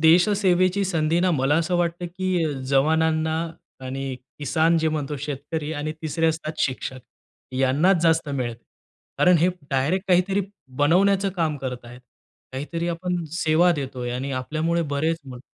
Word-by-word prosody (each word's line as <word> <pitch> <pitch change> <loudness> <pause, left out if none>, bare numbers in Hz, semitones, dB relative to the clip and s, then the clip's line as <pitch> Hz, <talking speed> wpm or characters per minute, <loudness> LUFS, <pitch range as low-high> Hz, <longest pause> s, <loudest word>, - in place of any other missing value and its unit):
देश-सेवेची 185 +3 +4
संधी 165 -3 +1
ना 185 0 +3
मला 140 -3 +2
असं 170 +2 0
वाटतं, 175 0 -1
की 175 -3 -1
जवानांना 160 +3 +2 0.5
आणि 135 0 -4 0.2
किसान 160 +3 +2
जे 160 - +1
म्हणतो, 150 -2 -2
शेतकरी 145 +2 -4
आणि 155 0 -3
तिसरे 165 +1 0
असतात 160 -1 -1
शिक्षक, 130 0 -5 0.5
यांनाच 145 +8 +3
जास्त 165 -2 +3
मिळते. 120 -4 -3 0.6
कारण 180 -1 +6
हे 170 +3 +4 0.2
डायरेक्ट 150 +9 0
काहीतरी 185 +2 +3 0.4
बनवण्याचं 195 +6 +3
काम 160 -3 0
करतायेत. 125 -2 -7 0.5
काहीतरी 165 +6 -3
आपण 175 0 -2
सेवा 170 +1 +3
देतोय 130 -5 -4
आणि 135 +3 -3
आपल्यामुळे 155 +6 -1
बरेच 160 +3 0
म 130 -3 -9
160 Hz, 135 wpm, -24 LUFS, 140-175 Hz, 0.6 s, कारण